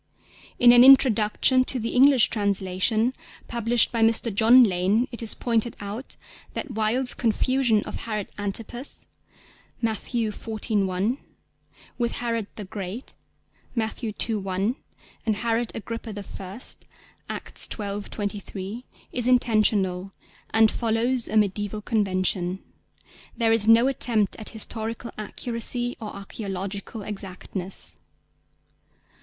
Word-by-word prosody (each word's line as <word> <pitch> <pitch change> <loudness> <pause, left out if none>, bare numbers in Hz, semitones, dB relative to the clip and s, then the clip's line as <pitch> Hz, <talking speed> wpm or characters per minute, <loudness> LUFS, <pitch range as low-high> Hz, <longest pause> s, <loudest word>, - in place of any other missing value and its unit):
In 240 0 +7
an 245 0 +8
introduction 255 -1 +5
to 255 - 0
the 230 0 -3
English 265 -1 +5
translation 205 +3 +1 0.3
published 235 0 +3
by 230 - -1
Mr. 225 0 +3
John 235 +5 +7
Lane 200 +4 +2
it 235 - -2
is 225 - +5
pointed 230 -1 0
out 210 +6 -7 0.4
that 300 - -4
Wilde's 230 +3 +1
confusion 235 -1 +1
of - - -6
Herod 210 -3 -3
Antipas 230 +6 -3 0.7
(Matt. 225 -2 0
xiv. 220 -2 -2
1) 195 +7 -1 0.8
with 235 -1 0
Herod 230 -3 -2
the 210 - -6
Great 200 +4 -7 0.6
(Matt. 220 +1 -2
ii. 225 +1 -1
1) 195 +4 -1 0.5
and 215 - +2
Herod 230 +1 -1
Agrippa 230 0 -6 0.2
I. 195 +5 -8 0.7
(Acts - - -3
xii. 205 -1 -3
23) 205 +1 -6 0.3
is 245 -1 -1
intentional, 210 -6 +2 0.4
and 220 -1 +4
follows 235 +2 +1
a - - -7
mediæval 210 0 0
convention. 185 -3 0 0.7
There 225 -2 +3
is 225 -1 +5
no 230 +3 +6
attempt 230 -6 +2
at 215 - -7
historical 225 +1 -4
accuracy 240 +3 -2
or 215 - -5
archæological 200 +1 -6
exactness. 195 -2 -5
220 Hz, 115 wpm, -25 LUFS, 200-235 Hz, 0.8 s, an